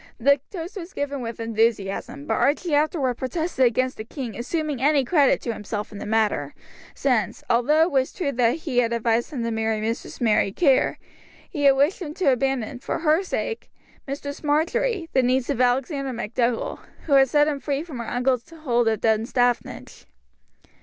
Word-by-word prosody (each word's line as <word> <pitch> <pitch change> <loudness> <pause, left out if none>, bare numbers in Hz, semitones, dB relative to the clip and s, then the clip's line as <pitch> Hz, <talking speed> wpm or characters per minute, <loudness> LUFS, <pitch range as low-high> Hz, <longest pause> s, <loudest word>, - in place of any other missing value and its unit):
The 280 +4 +4
toast 360 +2 -7
was 360 0 -8
given 285 -1 -3
with 230 -1 -6
enthusiasm; 225 +3 -1
but - - -1
Archie 305 +3 +1
afterwards 290 -4 +1
protested 315 0 0
against 255 +2 +1
the 215 - -5
king 240 0 -6
assuming 290 +2 -3
any 285 -1 +3
credit 285 -2 +3
to 235 - -3
himself 210 0 -5
in 205 - -8
the - - -6
matter, 210 -10 0 0.4
since, - - 0
although 290 +7 +4
it 335 - 0
was 265 -1 +1
true 325 -8 -2
that 235 -2 +2
he 295 -6 -1
had 235 -1 +1
advised 230 0 +1
him 265 -7 -4
to 230 - -1
marry 220 -1 -1
Mistress 225 +2 -4
Mary 215 -4 +2
Kerr, 275 - +2 0.5
he 290 -5 -2
had 275 -1 +7
wished 290 +8 +2
him 310 -3 -6
to 360 -8 +3
abandon, 255 -2 -1
for - - -3
her 320 +1 +2
sake, 420 +4 -4 0.4
Mistress 285 +2 -6
Marjory, 325 +6 0
the 260 - +4
niece 255 0 +1
of 250 - -1
Alexander 265 +2 0
MacDougall, 235 +1 -1 0.3
who 295 - 0
had 270 -1 +6
set 295 +2 +4
him 290 -2 -1
free 280 +2 -2
from 305 -8 -8
her 235 - -5
uncle's 250 0 0
hold 255 -8 0
of 220 -1 +1
Dunstaffnage. 230 +2 0
260 Hz, 180 wpm, -24 LUFS, 235-295 Hz, 0.5 s, had